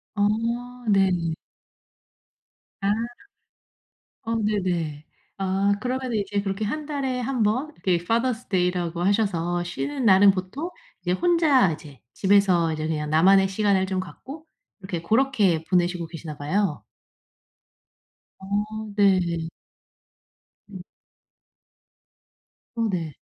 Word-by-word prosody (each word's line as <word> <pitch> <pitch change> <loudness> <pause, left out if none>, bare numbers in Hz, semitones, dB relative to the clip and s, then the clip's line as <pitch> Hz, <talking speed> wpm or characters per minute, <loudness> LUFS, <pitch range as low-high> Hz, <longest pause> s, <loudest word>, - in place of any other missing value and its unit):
어. 205 0 +3 0.6
네. 195 -2 +4 1.7
아. 195 - 0 1.4
어 230 +1 -1
네네. 180 -9 -1 0.3
아 195 +1 +1
그러면은 255 -1 -2
이제 200 0 -2
그렇게 195 +1 -3
1 300 +9 -3
달에 275 -4 -2
1 250 -2 -1
번 255 +9 0
이렇게 175 -2 +1
파더스 235 +3 0
데이 180 -2 +2
라고 175 -1 -3
하셔서 175 -3 +1
쉬는 270 +9 -3
날은 195 -1 +7
보통 195 - -5 0.3
이제 175 0 -2
혼자 300 - +3
이제 150 -4 -12
집에서 190 -4 +3
이제 155 0 -3
그냥 150 -2 -2
나만의 190 +5 +5
시간을 195 -1 +2
좀 190 0 -2
갖고 270 - -9 0.3
이렇게 190 -4 -5
고렇게 215 -5 +2
보내시고 175 -2 +1
계시나 155 -3 -8
봐요. 170 +2 -1 1.6
어 210 +2 -3
네. 200 -2 +5 1.5
음. 190 -3 -9 1.9
어 230 -1 0
네. 165 -5 -3
195 Hz, 205 characters per minute, -24 LUFS, 175-225 Hz, 1.9 s, 날은